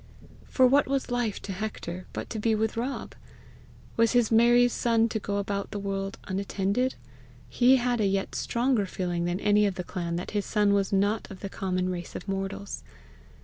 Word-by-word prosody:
For 260 - +3
what 275 +3 +4
was 270 -2 -1
life 240 -4 -1
to 200 - -5
Hector 185 -3 -5
but - - -5
to 220 - -3
be 220 +1 +2
with 220 0 0
Rob! 250 +4 -3 0.8
Was 230 +1 +4
his 240 -3 +3
Mary's 240 +2 +5
son 230 -1 +2
to 220 - -2
go 200 0 -2
about 200 0 -2
the 210 - -5
world 195 -1 -3
unattended! 200 +5 -1 0.5
He 255 +2 +5
had 245 -2 +1
a 205 - +3
yet 195 0 -1
stronger 235 -4 0
feeling 175 -2 -2
than 175 +1 -1
any 210 0 +4
of 195 - -2
the 180 - -4
clan 170 -2 -4
that 175 - -4
his 205 -2 0
son 210 -2 +3
was 200 -1 +1
not 205 +2 +1
of 190 -3 -10
the 195 - -4
common 185 -2 -1
race 175 -1 -5
of - - -7
mortals. 195 +1 -4
205 Hz, 190 wpm, -27 LUFS, 195-235 Hz, 0.8 s, Mary's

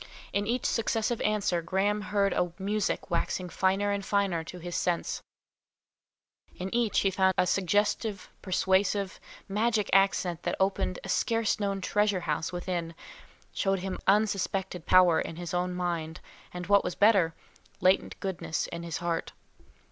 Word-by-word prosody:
In 205 0 0
each 245 +2 -1
successive 225 0 0
answer, 205 -5 +1
Graham 195 +5 0
heard 205 -2 +1
a 175 -1 0
music 205 +1 -2
waxing 180 -1 -1
finer 195 +3 +1
and 200 0 -2
finer 195 -5 0
to 180 - -8
his 175 0 -6
sense; 175 -1 -1 1.3
in 185 +1 -5
each 235 -3 +2
he 195 - +2
found 190 0 +2
a - - +4
suggestive, 205 +2 0
persuasive, 190 +1 +1 0.3
magic 210 +1 0
accent 185 -3 +3
that - - -1
opened 190 -1 0
a - - -7
scarce 225 -2 +1
known 200 -1 -1
treasure 205 -1 +1
house 165 -1 -2
within, 175 -2 -3 0.6
showed 195 -1 0
him 190 0 -4
unsuspected 195 -3 +1
power 180 -3 +6
in 165 - -5
his 175 0 -6
own 180 +1 0
mind, 170 -3 -3 0.3
and 180 0 -6
what 200 +2 +4
was - - -3
better, 195 -6 +4 0.4
latent 185 +1 +2
goodness 185 -4 -2
in 170 - -6
his 170 -1 -4
heart. 165 -1 -2
190 Hz, 150 wpm, -29 LUFS, 180-205 Hz, 1.3 s, power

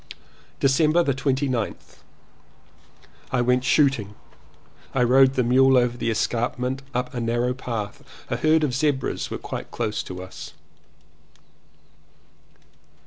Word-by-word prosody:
December 155 +5 +3
29th. 135 -4 -2 1.3
I 130 - +1
went 125 +1 +2
shooting. 130 -7 +2 0.8
I 130 - +3
rode 130 +2 +5
the 130 - +2
mule 130 +2 +5
over 120 -1 +2
the 120 - -2
escarpment 125 +3 -1
up 125 0 -3
a 125 - -3
narrow 120 +2 0
path. 115 -5 -5 0.3
A - - 0
herd 155 0 +3
of 140 -4 0
zebras 140 0 -1
were - - -4
quite - - -7
close 105 - -2
to 90 0 -7
us. 95 - -10
125 Hz, 115 wpm, -24 LUFS, 120-135 Hz, 1.3 s, rode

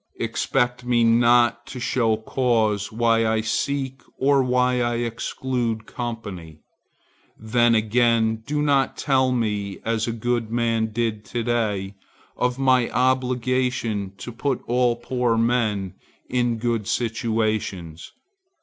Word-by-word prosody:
Expect 125 -1 -1
me 120 -1 +2
not 120 +1 +4
to 125 - -7
show 115 -2 +1
cause 110 -3 0
why 115 0 +2
I 110 0 +1
seek 135 +3 -2 0.2
or 140 0 +3
why 125 0 +2
I 120 0 0
exclude 115 -1 -2
company. 100 -12 -7 0.8
Then 115 +1 +2
again, 110 0 +2
do 145 +7 -2
not 140 -2 +2
tell 130 -2 +2
me, 105 -5 -1
as 115 0 0
a - - 0
good 115 0 -2
man 115 -1 0
did 110 -1 -2
to 120 - -3
day, 105 -5 -1 0.4
of 125 0 0
my 130 -3 +3
obligation 125 -5 0
to 120 - -7
put 130 +2 -2
all 120 0 +2
poor 120 -1 -1
men 110 -5 0 0.3
in 120 -2 0
good 115 -2 -1
situations. 110 -8 -2
120 Hz, 120 wpm, -23 LUFS, 110-125 Hz, 0.8 s, not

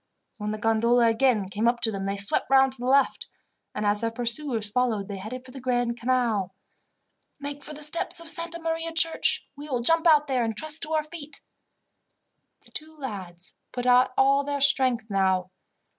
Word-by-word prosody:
When 210 -1 -4
the 215 - -3
gondola 230 +2 +2
again 225 -3 +1
came 210 +4 -1
up 240 0 +1
to 225 -2 +1
them 195 -1 -4
they 200 0 -2
swept 200 0 +2
round 265 -1 +4
to 265 - -11
the 245 - -4
left, 275 +1 +2 0.5
and 210 - -3
as 205 0 +1
their 230 - 0
pursuers 235 -1 -3
followed 225 -4 0
they 200 -2 -6
headed 250 +6 -8
for 255 - -12
the 265 - -10
Grand 245 -2 -1
Canal. 230 -6 -1 0.8
"Make 285 0 -6
for 300 - -9
the 300 - -1
steps 335 +3 +3
of 335 - -10
Santa 335 0 0
Maria 330 0 -3
church. 325 0 +2
We 290 +1 -9
will 250 -3 -1
jump 330 +6 +3
out 300 -2 +5
there 260 -4 0
and 225 -2 -3
trust 310 0 +2
to 320 0 -3
our 310 -1 +1
feet." 305 -2 -10 1.2
The - - -20
two 315 +1 -3
lads 190 - -8 0.2
put 245 -1 -5
out 250 0 +4
all 275 +1 +3
their 285 0 -3
strength 260 -5 +2
now. 190 -2 0
250 Hz, 195 wpm, -25 LUFS, 220-290 Hz, 1.2 s, out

